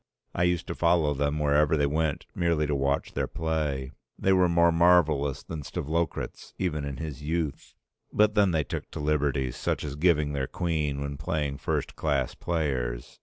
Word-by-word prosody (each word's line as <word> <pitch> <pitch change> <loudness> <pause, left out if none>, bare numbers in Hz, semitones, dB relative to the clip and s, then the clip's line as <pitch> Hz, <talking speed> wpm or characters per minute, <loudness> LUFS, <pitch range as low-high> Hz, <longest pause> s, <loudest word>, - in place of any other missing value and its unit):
I 85 - +1
used 90 -1 +1
to - - -4
follow 85 -3 +2
them 70 +1 0
wherever 75 +1 +3
they 70 - +3
went 75 0 -1
merely 85 -3 +1
to 75 - -1
watch 70 0 0
their - - -1
play. 75 -5 -2 0.3
They 95 - +3
were 90 -1 +4
more 85 0 +4
marvellous 80 -5 +3
than 80 -2 -6
Stavlokratz 80 +3 -3
even 75 -6 -1
in 70 -1 -5
his 75 -3 -6
youth. 80 -1 -3 0.4
But 105 0 +3
then 105 -2 +4
they 80 -3 +1
took - - -5
to - - -7
liberties 75 -4 0
such - - -2
as 70 -2 -4
giving 75 -2 +2
their 70 -2 -1
queen 75 -5 -1
when 70 0 -4
playing 75 -3 -2
first - - -2
class 70 -5 0
players. 65 -8 -2
75 Hz, 175 wpm, -27 LUFS, 70-85 Hz, 0.4 s, were